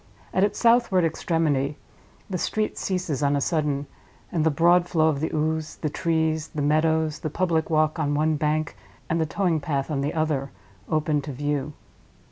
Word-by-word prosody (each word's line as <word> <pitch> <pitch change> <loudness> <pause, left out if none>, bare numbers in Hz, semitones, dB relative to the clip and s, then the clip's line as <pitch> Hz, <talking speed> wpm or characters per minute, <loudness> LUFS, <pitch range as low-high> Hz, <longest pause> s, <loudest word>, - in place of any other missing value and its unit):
At 190 - +3
its 205 - +1
southward 230 -7 +4
extremity 155 -4 0 0.5
the 185 -3 -3
street 215 +4 -1
ceases 180 -7 -2
on 145 0 +2
a - - +1
sudden, 145 -1 0 0.5
and 165 -3 0
the 160 - +4
broad 175 +4 +3
flow 160 -1 +3
of 145 -3 -1
the 160 - -2
Ouse, 155 0 -1
the 155 - -3
trees, 160 -1 0
the 150 - -5
meadows, 155 +1 +2
the 155 - -3
public 165 -1 0
walk 155 0 +2
on 145 -2 0
one 155 +1 +2
bank 150 0 -1 0.4
and 165 0 +1
the 160 - 0
towing 175 -3 +1
path 140 0 -2
on 140 -2 0
the 145 +3 -2
other, 150 -4 0 0.4
open 155 -1 +1
to 145 - -6
view. 145 +1 -2
155 Hz, 180 wpm, -25 LUFS, 145-165 Hz, 0.5 s, southward